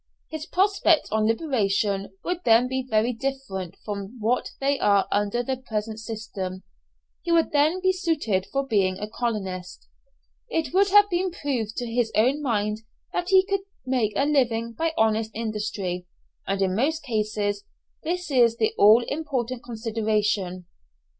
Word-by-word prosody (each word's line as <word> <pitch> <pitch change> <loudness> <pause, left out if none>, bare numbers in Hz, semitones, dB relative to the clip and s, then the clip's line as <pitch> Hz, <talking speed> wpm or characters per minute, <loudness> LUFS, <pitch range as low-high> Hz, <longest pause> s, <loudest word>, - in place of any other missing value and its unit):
His 315 0 -5
prospects 370 -4 +2
on 215 0 +2
liberation 205 -6 0
would 355 0 -2
then 230 +2 +5
be 260 +1 -1
very 220 +2 +2
different 225 -9 -4
from 205 +2 -5
what 230 +4 0
they 275 0 +1
are 200 -1 +3
under 205 +4 +1
the 260 +1 -2
present 220 -3 -4
system. 210 -4 -6 0.6
He 340 - -3
would 335 0 +3
then 310 +5 +2
be 375 - +5
suited 295 - 0
for 275 0 0
being 195 -7 +1
a 210 - -4
colonist. 195 -6 -4 0.6
It 325 - -1
would 395 +2 +4
have 410 +1 +7
been 360 +2 +1
proved 260 -10 -3
to 245 - -2
his 235 0 0
own 255 +7 +3
mind 210 -5 0 0.3
that 355 +1 -2
he 380 0 +6
could 395 -1 0 0.2
make 250 -5 0
a 275 - +2
living 235 -6 +1
by 325 +8 -1
honest 220 0 +2
industry, 205 -5 -3 0.4
and 195 0 0
in 185 -1 0
most 305 +8 0
cases 210 -4 -1 0.4
this 350 0 -3
is 235 -3 +4
the 220 -2 +1
all 215 +4 +7
important 255 -5 -3
consideration. 215 -5 -1
230 Hz, 155 wpm, -25 LUFS, 210-285 Hz, 0.6 s, have